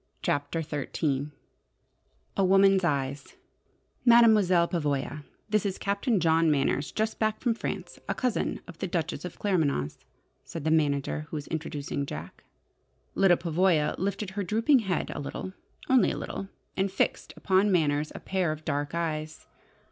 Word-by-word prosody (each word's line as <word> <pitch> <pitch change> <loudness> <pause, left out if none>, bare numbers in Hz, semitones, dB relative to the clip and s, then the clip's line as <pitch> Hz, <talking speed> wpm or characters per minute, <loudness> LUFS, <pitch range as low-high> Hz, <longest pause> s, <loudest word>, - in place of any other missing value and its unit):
CHAPTER 145 +3 -1
XIII 145 -1 -2 1.1
A 195 - +2
WOMAN'S 195 0 +5
EYES 140 -3 -2 0.7
"Mademoiselle 215 -8 +6
Pavoya, 150 -3 -2 0.2
this 215 -1 +1
is 195 -2 -2
Captain 200 +2 0
John 165 -1 +3
Manners, 140 -1 +1
just 220 0 -2
back 215 -1 0
from 240 -3 +1
France: 225 - -5
a - - 0
cousin 250 -4 -1
of 175 -2 -11
the - - -2
Duchess 170 0 -2
of 180 - -7
Claremanagh's," 155 - 0 0.4
said 165 - -7
the 155 - +1
manager 150 -1 +1
who 160 - -4
was 145 - -6
introducing 145 -3 -3
Jack. 85 - -8 0.7
Lyda 190 -3 +4
Pavoya 170 -2 +2
lifted 195 +1 -2
her 200 +1 -3
drooping 225 - +3
head 190 -7 -2
a - - -5
little 185 +6 -5 0.3
only 260 -2 +5
a - - -3
little, 195 - -5 0.3
and 195 0 0
fixed 195 - -1
upon 195 +2 +3
Manners 150 -4 +1
a - - -5
pair 185 -4 -1
of 155 +1 -7
dark 145 +1 -2
eyes. 155 -2 -3
170 Hz, 150 wpm, -28 LUFS, 150-195 Hz, 1.1 s, Mademoiselle